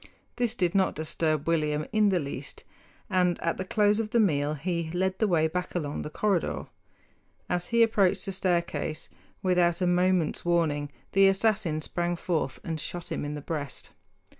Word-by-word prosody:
This 240 Hz, -1 st, 0 dB
did 180 Hz, -6 st, +1 dB
not 195 Hz, -1 st, +2 dB
disturb 155 Hz, -1 st, -1 dB
William 150 Hz, -2 st, +1 dB
in 215 Hz, -1 st, +4 dB
the 190 Hz, -, +2 dB
least, 140 Hz, -2 st, -6 dB, 0.4 s
and 180 Hz, -2 st, +2 dB
at 170 Hz, -, 0 dB
the -, -, -2 dB
close 210 Hz, +2 st, +2 dB
of 220 Hz, -1 st, -2 dB
the 235 Hz, -, +2 dB
meal 150 Hz, -7 st, +2 dB
he 170 Hz, +1 st, -2 dB
led 190 Hz, +1 st, 0 dB
the 220 Hz, -, +3 dB
way 160 Hz, -4 st, +3 dB
back 180 Hz, +3 st, -4 dB
along 150 Hz, -4 st, -2 dB
the -, -, -5 dB
corridor. 195 Hz, +2 st, 0 dB, 0.8 s
As 175 Hz, 0 st, -1 dB
he 235 Hz, 0 st, +4 dB
approached 200 Hz, -4 st, +2 dB
the 195 Hz, -, -3 dB
staircase, 175 Hz, -4 st, -1 dB, 0.3 s
without 175 Hz, -2 st, +3 dB
a 185 Hz, -, +1 dB
moment's 180 Hz, -2 st, +2 dB
warning 155 Hz, -4 st, +1 dB, 0.2 s
the 195 Hz, 0 st, +6 dB
assassin 195 Hz, -5 st, +1 dB
sprang 175 Hz, +3 st, -2 dB
forth 160 Hz, -7 st, -2 dB
and 160 Hz, -1 st, -3 dB
shot 175 Hz, +2 st, -6 dB
him -, -, -2 dB
in 145 Hz, +1 st, -4 dB
the 145 Hz, -, -6 dB
breast. 145 Hz, -3 st, -5 dB
175 Hz, 175 wpm, -28 LUFS, 155-190 Hz, 0.8 s, the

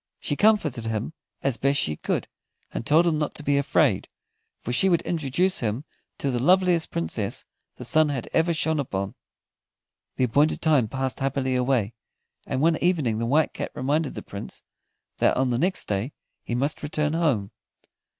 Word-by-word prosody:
She 145 Hz, -, -2 dB
comforted 155 Hz, -, +2 dB
him 110 Hz, +6 st, -3 dB, 0.3 s
as 135 Hz, -3 st, 0 dB
best 140 Hz, +1 st, +2 dB
she 75 Hz, -, 0 dB
could, -, -, -2 dB, 0.5 s
and -, -, -4 dB
told 160 Hz, +4 st, +5 dB
him 160 Hz, -3 st, +1 dB
not 150 Hz, -, -2 dB
to 150 Hz, -, -5 dB
be 145 Hz, -1 st, +2 dB
afraid, 140 Hz, -6 st, +2 dB, 0.6 s
for 120 Hz, -, -3 dB
she 190 Hz, +10 st, +4 dB
would 170 Hz, -2 st, +2 dB
introduce 170 Hz, +3 st, 0 dB
him 115 Hz, +5 st, -2 dB, 0.3 s
to 140 Hz, -, -1 dB
the 120 Hz, -1 st, -1 dB
loveliest 180 Hz, +1 st, +4 dB
Princess 85 Hz, -1 st, -3 dB, 0.3 s
the -, -, -8 dB
sun 155 Hz, -1 st, +4 dB
had 135 Hz, -5 st, -3 dB
ever 165 Hz, +1 st, +3 dB
shone 160 Hz, -1 st, 0 dB
upon. 100 Hz, -7 st, -3 dB, 1.0 s
The -, -, 0 dB
appointed 145 Hz, +6 st, +2 dB
time 150 Hz, -8 st, +3 dB
passed 130 Hz, +3 st, -3 dB
happily 135 Hz, -1 st, 0 dB
away, 125 Hz, -4 st, +1 dB, 0.5 s
and 130 Hz, -, -1 dB
one 160 Hz, +1 st, +3 dB
evening 150 Hz, -12 st, +1 dB
the 115 Hz, -, -1 dB
White 150 Hz, +5 st, +2 dB
Cat -, -, -4 dB
reminded 145 Hz, +3 st, 0 dB
the -, -, -6 dB
Prince 100 Hz, -, -8 dB, 0.6 s
that -, -, +3 dB
on 130 Hz, -1 st, +1 dB
the 120 Hz, -, 0 dB
next 185 Hz, +5 st, +1 dB
day 105 Hz, +7 st, -2 dB, 0.3 s
he 120 Hz, -, -4 dB
must 140 Hz, +5 st, -1 dB
return 150 Hz, 0 st, -1 dB
home. 140 Hz, -12 st, +1 dB
140 Hz, 175 wpm, -25 LUFS, 120-160 Hz, 1.0 s, told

